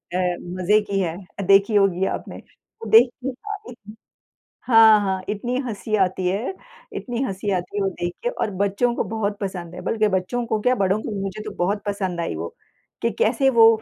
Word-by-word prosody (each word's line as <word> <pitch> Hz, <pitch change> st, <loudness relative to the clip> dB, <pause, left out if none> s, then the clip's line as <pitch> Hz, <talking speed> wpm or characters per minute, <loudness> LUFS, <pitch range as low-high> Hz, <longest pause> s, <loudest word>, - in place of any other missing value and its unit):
अ, -, -, +2 dB
मज़े 180 Hz, +2 st, +1 dB
की 200 Hz, -1 st, 0 dB
है। 170 Hz, -4 st, -1 dB, 0.2 s
अ, -, -, 0 dB
देखी 195 Hz, +3 st, +4 dB
होगी 190 Hz, -2 st, +3 dB
आपने, -, -, -4 dB
वो 225 Hz, -, -13 dB
देखने 245 Hz, +3 st, +5 dB
का 415 Hz, +11 st, -7 dB
इतन 215 Hz, -3 st, -12 dB, 0.7 s
हाँ, 225 Hz, -3 st, +7 dB
हाँ, 190 Hz, -2 st, -1 dB
इतनी 240 Hz, +4 st, -2 dB
हँसी 215 Hz, -1 st, -4 dB
आती 185 Hz, -2 st, +1 dB
है, 205 Hz, -, -1 dB, 0.4 s
इतनी 245 Hz, 0 st, -3 dB
हँसी 200 Hz, -2 st, -3 dB
आती 180 Hz, +1 st, -3 dB
है 205 Hz, -, +1 dB
वो 195 Hz, -, +1 dB
देख 175 Hz, -1 st, -4 dB
के 480 Hz, -, 0 dB
और -, -, -2 dB
बच्चों 200 Hz, +5 st, +1 dB
को -, -, -1 dB
बहुत 210 Hz, -2 st, -2 dB
पसंद 180 Hz, -4 st, -5 dB
है। 180 Hz, -, -7 dB
बल्कि 215 Hz, +2 st, +1 dB
बच्चों 190 Hz, +6 st, -1 dB
को 220 Hz, -2 st, -1 dB
क्या 250 Hz, +4 st, +3 dB
बड़ों 195 Hz, -2 st, +1 dB
को -, -, -5 dB
भी। 205 Hz, -2 st, -4 dB
मुझे 195 Hz, +2 st, -5 dB
तो -, -, -5 dB
बहुत 200 Hz, +4 st, 0 dB
पसंद 190 Hz, -4 st, -2 dB
आई 170 Hz, -, -2 dB
वो, 80 Hz, +2 st, -6 dB, 0.5 s
कि 230 Hz, -, +2 dB
कैसे 265 Hz, +4 st, +3 dB
वो 230 Hz, -3 st, +7 dB
205 Hz, 205 wpm, -22 LUFS, 185-225 Hz, 0.7 s, हाँ